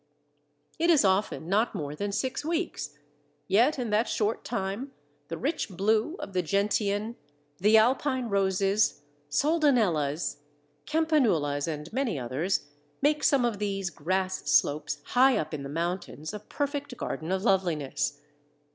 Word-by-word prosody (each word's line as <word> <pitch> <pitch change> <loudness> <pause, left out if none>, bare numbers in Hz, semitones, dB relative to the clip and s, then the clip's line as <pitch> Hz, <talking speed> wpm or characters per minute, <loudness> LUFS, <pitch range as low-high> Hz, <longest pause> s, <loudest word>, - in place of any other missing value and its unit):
It 335 +1 +2
is 310 -10 +5
often 190 -3 +1
not 215 +5 +1
more 150 -5 -4
than 200 +5 -3
six 260 +8 -2
weeks, 320 - -3 0.5
yet 235 +11 +4
in 240 -4 -3
that 215 +3 +2
short 215 +1 0
time 235 +5 -3 0.3
the 165 - -5
rich 295 -1 -2
blue 215 - +1
of 195 - -7
the 185 - +2
Gentian, 205 +4 0 0.4
the 210 +4 +5
Alpine 255 +2 +2
Roses, 195 -3 +1 0.3
Soldanellas, 205 - +2 0.5
Campanulas, 225 - +2
and 150 0 -5
many 255 - 0
others 140 +8 -1 0.4
make 300 +1 +2
some 270 -4 +4
of 225 -4 -1
these 195 -3 -2
grass 185 +1 -2
slopes 145 0 +2
high 260 +1 +5
up 155 - -3
in 150 - -3
the 140 - -6
mountains 165 0 -3
a 210 - -5
perfect 285 +2 -4
garden 160 +3 -4
of 190 0 0
loveliness. 160 - 0
200 Hz, 140 wpm, -28 LUFS, 165-245 Hz, 0.5 s, is